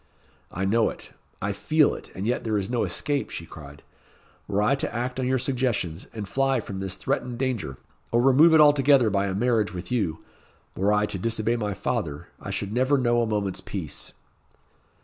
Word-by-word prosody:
"I 95 +3 -2
know 110 +3 +3
it - - -9 0.3
I 100 0 0
feel 155 +8 +3
it; - - -9
and 95 - -4
yet 125 +2 0
there 110 -2 0
is 100 +2 -3
no 120 - +1
escape," 145 -1 -1
she 85 - -6
cried, 75 -3 -12 0.6
"Were 100 +1 +1
I 125 - +3
to 140 - -1
act 125 +2 -3
on 130 - 0
your 130 +1 +2
suggestions, 120 - -1
and 105 -3 -6
fly 135 +4 +1
from 100 -3 -6
this 95 -1 -3
threatened 120 -1 -2
danger, 115 - -2 0.3
or 120 - +3
remove 150 +5 +6
it 155 - +7
altogether 140 -5 +5
by 100 0 +1
a 95 - -2
marriage 110 -4 +1
with 90 +3 -7
you 95 -10 -1 0.5
were 100 +3 +2
I 105 0 +3
to 95 - -4
disobey 115 +2 0
my 105 -4 -2
father, 85 - -3
I - - -8
should 100 +1 -3
never 130 +4 +3
know 120 -2 +2
a 115 - 0
moment's 105 -3 -1
peace." - - -6
115 Hz, 195 wpm, -25 LUFS, 95-130 Hz, 0.6 s, it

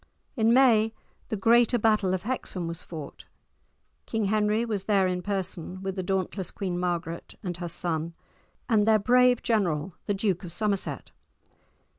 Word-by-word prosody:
In 225 -3 +3
May 225 -4 +4 0.3
the - - -1
greater 235 +4 +4
battle 215 -4 +2
of 185 - -5
Hexham 195 -7 -3
was 165 0 -4
fought. 155 -5 -9 0.8
King 220 -2 -1
Henry 215 +2 +1
was 205 -4 -3
there 200 -3 +3
in 180 -1 -1
person, 185 -2 -3
with 190 -1 -3
the 190 - -2
dauntless 190 0 -2
Queen 180 -3 -3
Margaret 175 -1 -3
and 180 -3 -3
her 175 -1 -5
son, 165 -1 -3 0.5
and 215 -3 +3
their 220 -1 +6
brave 250 +3 +4
general, 185 -8 0
the 205 - +1
Duke 195 -2 0
of 175 - -6
Somerset. 200 +1 -2
195 Hz, 155 wpm, -27 LUFS, 180-220 Hz, 0.8 s, their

